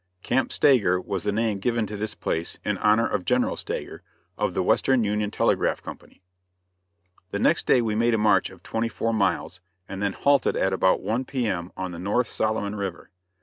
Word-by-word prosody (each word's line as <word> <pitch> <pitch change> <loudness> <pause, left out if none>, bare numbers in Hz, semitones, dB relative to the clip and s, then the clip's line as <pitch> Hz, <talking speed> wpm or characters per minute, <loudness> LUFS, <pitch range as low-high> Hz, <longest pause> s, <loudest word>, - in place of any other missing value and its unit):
Camp 130 +2 0
Stager 105 -10 +4
was 95 -1 -4
the 105 - +1
name 110 -1 0
given 115 +1 0
to 105 - -6
this 105 +1 -4
place, 80 +1 -3
in - - -1
honor 110 +2 +3
of 90 - -2
General - - +1
Stager, - - -6 0.3
of - - -2
the - - +1
Western 130 -3 +3
Union 105 0 0
Telegraph - - 0
Company. - - -11 1.1
The 100 - -3
next 155 +10 +2
day 125 - +4
we 110 -2 -1
made 115 +2 +2
a - - +1
march 105 0 +3
of - - -16
twenty 115 +1 -2
four 115 0 -2
miles, 100 -3 -1 0.3
and 95 0 -6
then 100 -1 0
halted 140 +3 +2
at 95 - +1
about 95 0 +2
1 120 +4 -1
P. 130 -3 -2
M. 90 -4 -2
on 95 -1 -4
the 85 - -8
North 105 +6 0
Solomon 110 -2 -1
River. 100 -4 -5
105 Hz, 195 wpm, -25 LUFS, 95-115 Hz, 1.1 s, Stager